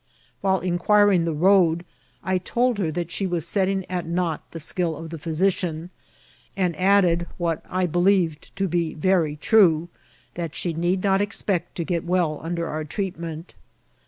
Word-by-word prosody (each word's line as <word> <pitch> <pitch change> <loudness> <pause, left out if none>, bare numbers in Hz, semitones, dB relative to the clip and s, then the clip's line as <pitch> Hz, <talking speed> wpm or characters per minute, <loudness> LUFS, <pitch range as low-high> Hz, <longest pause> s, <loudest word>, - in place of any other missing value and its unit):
While 190 -2 +1
inquiring 185 +1 +3
the 165 - 0
road, 170 0 +3 0.4
I 185 0 0
told 240 +4 0
her 175 -5 0
that 170 +1 -4
she 195 +3 -2
was 175 -2 -2
set 195 +1 +1
ting 190 -1 -1
at 180 -2 -3
naught 170 -2 -1
the 165 - -8
skill 165 0 -1
of 165 0 -8
the 165 - -6
physician, 170 +1 -1 0.7
and 180 -3 0
added, 180 -1 +3
what 165 -2 -1
I 185 0 0
believed 175 -2 +1
to 195 - 0
be 170 -2 -1
very 165 -2 +1
true, 170 -2 +4 0.4
that 170 -3 -5
she 175 - -2
need 175 +3 0
not 195 -1 +3
ex 205 +1 -3
pect 175 -4 -1
to 170 - -2
get 170 0 -2
well 170 -4 0
under 170 +1 -3
our 155 0 -3
treatment. 165 -1 -5
175 Hz, 170 wpm, -24 LUFS, 165-190 Hz, 0.7 s, true